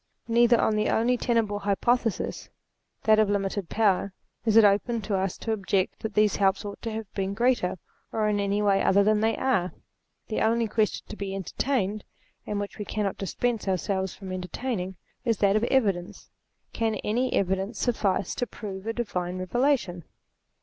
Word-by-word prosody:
Neither 235 Hz, 0 st, +4 dB
on 220 Hz, -, +2 dB
the 210 Hz, -, +1 dB
only 240 Hz, +3 st, +2 dB
tenable 225 Hz, -4 st, 0 dB
hypothesis, 225 Hz, +3 st, 0 dB, 0.5 s
that 215 Hz, 0 st, +5 dB
of 215 Hz, -2 st, +3 dB
limited 195 Hz, -2 st, -1 dB
power, 200 Hz, -3 st, +1 dB, 0.3 s
is 220 Hz, -1 st, +4 dB
it 225 Hz, -, +9 dB
open 210 Hz, +4 st, +2 dB
to 200 Hz, 0 st, -1 dB
us 190 Hz, -1 st, -1 dB
to 225 Hz, -, -3 dB
object 195 Hz, -2 st, 0 dB
that 220 Hz, -2 st, -5 dB
these 210 Hz, -1 st, +3 dB
helps 195 Hz, 0 st, +2 dB
ought 205 Hz, -, -7 dB
to 230 Hz, -, -4 dB
have 220 Hz, -2 st, -6 dB
been 195 Hz, 0 st, -2 dB
greater, 240 Hz, -6 st, +1 dB, 0.3 s
or 215 Hz, -1 st, 0 dB
in 210 Hz, -1 st, +1 dB
any 200 Hz, +1 st, 0 dB
way 200 Hz, -1 st, +3 dB
other 200 Hz, +1 st, +4 dB
than 215 Hz, +1 st, +3 dB
they 225 Hz, 0 st, +1 dB
are. 190 Hz, -9 st, +1 dB, 0.5 s
The 215 Hz, -, -2 dB
only 230 Hz, +1 st, +2 dB
question 215 Hz, 0 st, 0 dB
to -, -, -7 dB
be 195 Hz, -2 st, -4 dB
entertained, 205 Hz, +1 st, -1 dB, 0.4 s
and 205 Hz, -, -2 dB
which 205 Hz, +1 st, -6 dB
we 210 Hz, -, -3 dB
cannot 205 Hz, -2 st, -2 dB
dis 195 Hz, -, -4 dB
pense 240 Hz, -4 st, -1 dB
ourselves 190 Hz, 0 st, -1 dB
from 190 Hz, -2 st, -8 dB
entertaining, 185 Hz, +1 st, -3 dB, 0.3 s
is 230 Hz, -4 st, +1 dB
that 200 Hz, 0 st, +3 dB
of 215 Hz, +2 st, +2 dB
evidence. 200 Hz, -10 st, 0 dB, 0.4 s
Can 225 Hz, -1 st, 0 dB
any 245 Hz, +4 st, 0 dB
evidence 195 Hz, +3 st, 0 dB
suffice 205 Hz, -6 st, 0 dB
to 245 Hz, -, -2 dB
prove 200 Hz, -2 st, -7 dB
a 225 Hz, -, 0 dB
Divine 185 Hz, -6 st, -3 dB
Revela 245 Hz, +10 st, +2 dB
tion 175 Hz, -6 st, -8 dB
210 Hz, 180 wpm, -27 LUFS, 195-225 Hz, 0.5 s, it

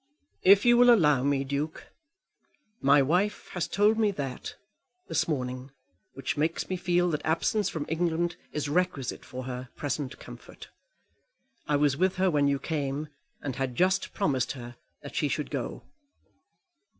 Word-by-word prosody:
"If 200 Hz, +3 st, +6 dB
you 240 Hz, 0 st, +6 dB
will 245 Hz, 0 st, +7 dB
allow 150 Hz, -, +5 dB
me, 140 Hz, -1 st, +1 dB
Duke. 140 Hz, +3 st, -4 dB, 0.9 s
My 140 Hz, +1 st, +5 dB
wife 180 Hz, +9 st, 0 dB
has 175 Hz, -2 st, -2 dB
told 210 Hz, +2 st, +3 dB
me 215 Hz, -2 st, +4 dB
that, 140 Hz, -9 st, -5 dB, 0.5 s
this 165 Hz, -, 0 dB
morning, 130 Hz, -3 st, -3 dB, 0.5 s
which 135 Hz, +3 st, -3 dB
makes 160 Hz, +3 st, -1 dB
me 185 Hz, -, -1 dB
feel 175 Hz, 0 st, +1 dB
that 150 Hz, -, -2 dB
absence 185 Hz, +5 st, +1 dB
from 155 Hz, -3 st, -4 dB
England 170 Hz, +1 st, 0 dB, 0.2 s
is 150 Hz, -1 st, -2 dB
requisite 150 Hz, -4 st, -1 dB
for 130 Hz, 0 st, -7 dB
her 125 Hz, 0 st, -6 dB
present 145 Hz, -2 st, -3 dB
comfort. -, -, -12 dB, 1.0 s
I 150 Hz, -, +2 dB
was 145 Hz, -1 st, +2 dB
with 185 Hz, +1 st, +2 dB
her 185 Hz, 0 st, +2 dB
when 145 Hz, -2 st, +3 dB
you 140 Hz, 0 st, +2 dB
came, 145 Hz, 0 st, -3 dB, 0.3 s
and 135 Hz, -3 st, -4 dB
had 130 Hz, -2 st, -2 dB
just 190 Hz, +4 st, +2 dB
promised 140 Hz, -, 0 dB
her 120 Hz, -2 st, -9 dB, 0.3 s
that -, -, -9 dB
she -, -, +1 dB
should -, -, -3 dB
go." -, -, -4 dB
150 Hz, 155 wpm, -28 LUFS, 135-180 Hz, 1.0 s, will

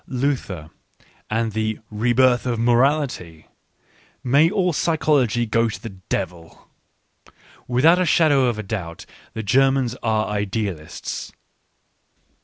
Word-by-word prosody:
Luther 120 Hz, -, -3 dB, 0.6 s
and 115 Hz, +1 st, -1 dB
the 110 Hz, 0 st, -2 dB
" -, -, -40 dB
rebirth 120 Hz, +3 st, +2 dB
of 120 Hz, -2 st, -1 dB
morality 120 Hz, -, +1 dB, 0.4 s
"! -, -, -35 dB, 0.3 s
May 140 Hz, +6 st, +4 dB
all 180 Hz, -2 st, 0 dB
psychology 145 Hz, -8 st, +1 dB
go 115 Hz, +1 st, +1 dB
to 110 Hz, -, -6 dB
the 115 Hz, -3 st, -8 dB, 0.2 s
devil! 85 Hz, -4 st, -5 dB, 1.0 s
Without 155 Hz, +9 st, +4 dB
a -, -, +2 dB
shadow 145 Hz, -6 st, +4 dB
of 120 Hz, -3 st, -1 dB
a 110 Hz, -, -4 dB
doubt 95 Hz, -5 st, -6 dB, 0.3 s
the 110 Hz, -, -5 dB
Ger 135 Hz, +6 st, +4 dB
mans 130 Hz, -3 st, -1 dB
are 110 Hz, -1 st, 0 dB
idealists. 100 Hz, -5 st, -4 dB
120 Hz, 125 wpm, -22 LUFS, 105-135 Hz, 1.0 s, May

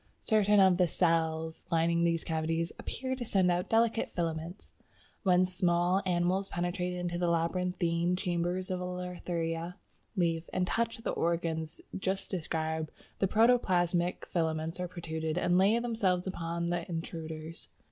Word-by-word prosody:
Certain 210 Hz, -2 st, +4 dB
of 190 Hz, -2 st, +6 dB
the 180 Hz, -1 st, +4 dB
cells 160 Hz, -2 st, 0 dB
lining 170 Hz, +1 st, +2 dB
these 170 Hz, -1 st, +1 dB
cavities 165 Hz, +1 st, -1 dB
"appear 260 Hz, +1 st, -3 dB
to 255 Hz, -, -4 dB
send 190 Hz, -5 st, +2 dB
out 175 Hz, +2 st, -1 dB
delicate 225 Hz, 0 st, +2 dB
filaments. 165 Hz, +2 st, -4 dB, 0.5 s
"When 185 Hz, -2 st, +4 dB
small 180 Hz, 0 st, +2 dB
animals 180 Hz, +2 st, +1 dB
penetrate 180 Hz, +1 st, -2 dB
into 175 Hz, -1 st, -2 dB
the 175 Hz, -, +1 dB
labyrinthine 170 Hz, 0 st, +1 dB
chambers 180 Hz, +1 st, -1 dB
of 180 Hz, -1 st, -2 dB
a -, -, -3 dB
Lathraea 175 Hz, -2 st, -3 dB, 0.4 s
leaf 165 Hz, -3 st, 0 dB
and 185 Hz, -, +1 dB
touch 230 Hz, +5 st, -1 dB
the 225 Hz, -, -3 dB
organs 165 Hz, -2 st, -1 dB
just 190 Hz, +1 st, -2 dB
described, 160 Hz, -3 st, -2 dB, 0.3 s
the 195 Hz, -, +3 dB
protoplasmic 180 Hz, -6 st, +2 dB
filaments 160 Hz, 0 st, -1 dB
are 180 Hz, -, -2 dB
protruded 160 Hz, -2 st, -4 dB
and 180 Hz, 0 st, +3 dB
lay 200 Hz, +4 st, +5 dB
themselves 215 Hz, -7 st, 0 dB
upon 170 Hz, -2 st, -3 dB
the 175 Hz, +1 st, -2 dB
intruders. 165 Hz, -1 st, -6 dB
175 Hz, 140 wpm, -31 LUFS, 165-185 Hz, 0.5 s, of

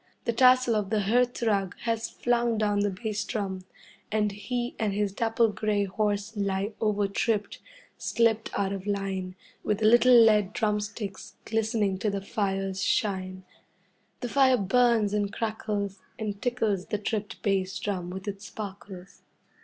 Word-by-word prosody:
The 235 Hz, -, +1 dB
tassel 255 Hz, 0 st, +5 dB
of 210 Hz, -2 st, -1 dB
the 215 Hz, -1 st, +1 dB
hearth 245 Hz, +4 st, +1 dB
rug 200 Hz, -5 st, +1 dB
has 230 Hz, -1 st, -1 dB
flung 240 Hz, -1 st, 0 dB
down 205 Hz, -1 st, +1 dB
the 205 Hz, 0 st, +2 dB
bass 205 Hz, +1 st, -3 dB
drum, 190 Hz, -5 st, -4 dB, 0.5 s
and 210 Hz, -1 st, +1 dB
he 240 Hz, +4 st, -3 dB
and 215 Hz, -3 st, 0 dB
his 205 Hz, -1 st, 0 dB
dapple 225 Hz, +1 st, +2 dB
grey 210 Hz, 0 st, 0 dB
horse 205 Hz, +2 st, -1 dB
lie 200 Hz, 0 st, -1 dB
overtripped, 210 Hz, 0 st, 0 dB, 0.4 s
slipped 225 Hz, -1 st, +1 dB
out 200 Hz, -1 st, 0 dB
of 195 Hz, 0 st, -6 dB
line, 195 Hz, -2 st, -2 dB, 0.3 s
with 210 Hz, -, 0 dB
the 215 Hz, -, 0 dB
little 240 Hz, +3 st, +6 dB
lead 210 Hz, -3 st, +5 dB
drumsticks 210 Hz, -2 st, -3 dB
glistening 215 Hz, -3 st, 0 dB
to 210 Hz, -, 0 dB
the 200 Hz, 0 st, -2 dB
fire's 195 Hz, -1 st, -2 dB
shine. 185 Hz, -3 st, -1 dB, 0.8 s
The 245 Hz, -, -3 dB
fire 265 Hz, 0 st, +4 dB
burns 225 Hz, 0 st, +3 dB
and 205 Hz, -1 st, 0 dB
crackles, 210 Hz, -3 st, -3 dB, 0.2 s
and 205 Hz, -2 st, -4 dB
tickles 220 Hz, -7 st, 0 dB
the 210 Hz, -, -1 dB
tripped 210 Hz, 0 st, -3 dB
bass 195 Hz, -2 st, 0 dB
drum 185 Hz, -4 st, -3 dB
with 190 Hz, +3 st, -7 dB
its 200 Hz, 0 st, -5 dB
sparkles. 195 Hz, -2 st, -9 dB
210 Hz, 150 wpm, -27 LUFS, 195-225 Hz, 0.8 s, little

